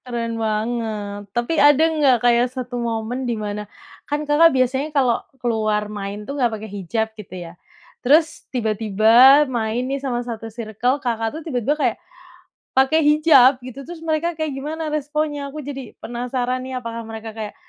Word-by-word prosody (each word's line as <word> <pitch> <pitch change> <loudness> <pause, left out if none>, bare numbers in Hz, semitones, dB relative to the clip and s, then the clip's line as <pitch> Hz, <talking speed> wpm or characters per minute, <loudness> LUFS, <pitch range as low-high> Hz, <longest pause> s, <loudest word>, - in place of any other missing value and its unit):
Keren 235 -2 -3
banget. 215 -2 -2
Tapi 240 +9 0
ada 290 +1 +6
nggak 300 -6 +3
kayak 240 +1 +4
1 255 -1 -7
momen 235 +2 -3
di 235 - -1
mana, 210 -1 -5 0.4
kan, 295 +1 -1
Kakak, 295 +3 +6
biasanya 265 +1 0
kalau 265 -6 +1 0.2
keluar 215 -4 0
main 205 0 -5
tuh 280 - -5
nggak 240 - +4
pakai 215 +1 -9
hijab 205 +3 -2
gitu 210 -4 -11
ya? 165 - -10 0.5
Terus 310 +5 +2
tiba-tiba 225 +4 +5
main 240 -2 -2
nih 270 +1 -3
sama 245 -3 -2
1 225 -2 -6
circle, 230 +3 -1
Kakak, 230 0 -2
tuh - - -7
tiba-tiba 280 -1 -1
kayak 300 - 0 0.7
pakai 270 +5 +3
hijab 295 -4 +6
gitu. 255 +2 -8
Terus 340 +4 -9
mereka 325 +1 -1
kayak 310 -3 -2
gimana 310 +4 -4
responnya, 295 -1 -2
aku 305 - -8
jadi 275 -4 -8
penasaran 250 +1 -3
nih, 260 0 -4
apakah 230 -1 -6
mereka 225 0 -8
kayak 215 -2 -6
245 Hz, 165 wpm, -21 LUFS, 225-285 Hz, 0.7 s, ada